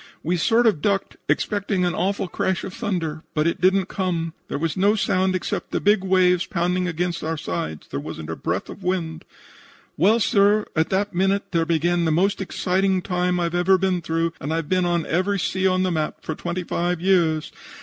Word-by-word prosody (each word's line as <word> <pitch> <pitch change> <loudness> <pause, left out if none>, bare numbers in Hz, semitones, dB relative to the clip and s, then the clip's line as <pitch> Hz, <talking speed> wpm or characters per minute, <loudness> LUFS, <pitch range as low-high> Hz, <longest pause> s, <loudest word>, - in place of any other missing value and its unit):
We 175 +3 0
sort 230 +8 +3
of 205 -10 +3
ducked, 200 +1 0
expecting 200 -3 0
an 175 - 0
awful 195 0 -1
crash 190 +1 -1
of 190 - -6
thunder, 175 -9 -3
but 150 0 +2
it 170 0 0
didn't 190 +1 +3
come. 170 -4 -2
There - - -3
was 160 +1 -2
no 200 +3 +3
sound 185 -2 +1
except 185 - -3
the - - -1
big 205 -1 +3
waves 185 -1 +3
pounding 180 +1 0
against 175 0 -2
our 160 +1 -2
sides. 80 - -4
There 70 - -4
wasn't - - -6
a - - -3
breath - - -3
of - - -10
wind. 170 -3 -2 0.7
"Well, 210 +9 +4
sir, 205 0 +3
at 160 0 +1
that 200 +1 0
minute 195 +3 0
there 165 -2 +1
began 170 +1 +1
the 160 - +2
most 190 +5 +1
exciting 190 0 0
time 180 -1 0
I've 170 -1 -1
ever 180 +2 +4
been 185 -1 0
through, 165 0 -1
and 145 - -3
I've 165 -1 -1
been 185 +1 +1
on 175 -2 0
every 185 +4 0
sea 190 +1 0
on 185 0 +2
the 185 - 0
map 155 -2 -2
for 160 - -3
twenty 175 +3 -4
five 175 0 -1
years. 170 -4 +2
180 Hz, 200 wpm, -23 LUFS, 165-190 Hz, 0.7 s, Well